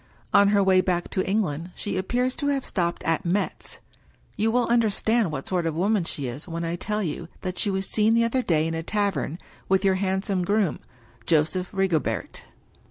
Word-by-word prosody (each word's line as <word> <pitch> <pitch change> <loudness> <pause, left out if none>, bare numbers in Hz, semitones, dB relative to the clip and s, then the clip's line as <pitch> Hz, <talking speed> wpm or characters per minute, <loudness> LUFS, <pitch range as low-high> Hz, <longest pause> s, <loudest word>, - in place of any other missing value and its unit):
On 200 - +6
her 200 -1 +4
way 190 -1 +5
back 175 -2 -1
to 185 - 0
England 175 -5 -1
she 200 -2 -3
ap 185 0 -2
pears 250 +1 0
to 285 - -1
have 275 -2 0
stopped 170 -3 -2
at 165 +3 0
Metz. 190 +3 -2 0.6
You 220 +2 +1
will 245 +1 +2
understand 225 -3 +2
what 140 -2 -5
sort 175 -3 0
of 160 - -2
woman 195 +1 +1
she 145 -4 -4
is 130 +6 -6
when 170 0 -4
I 165 +1 -2
tell 210 +4 -2
you 165 0 -4
that 185 -1 -4
she 205 - +1
was 190 0 -1
seen 220 +1 +3
the 230 - +4
other 230 +3 +1
day 160 -8 +1
in 165 - -2
a 165 - -2
tavern 185 -5 -1 0.3
with 190 +1 +3
your 190 - +4
handsome 190 -1 0
groom, 200 -3 +1 0.5
Joseph 160 +3 +2
Rigobert." 190 -5 -1
190 Hz, 200 wpm, -25 LUFS, 170-210 Hz, 0.6 s, On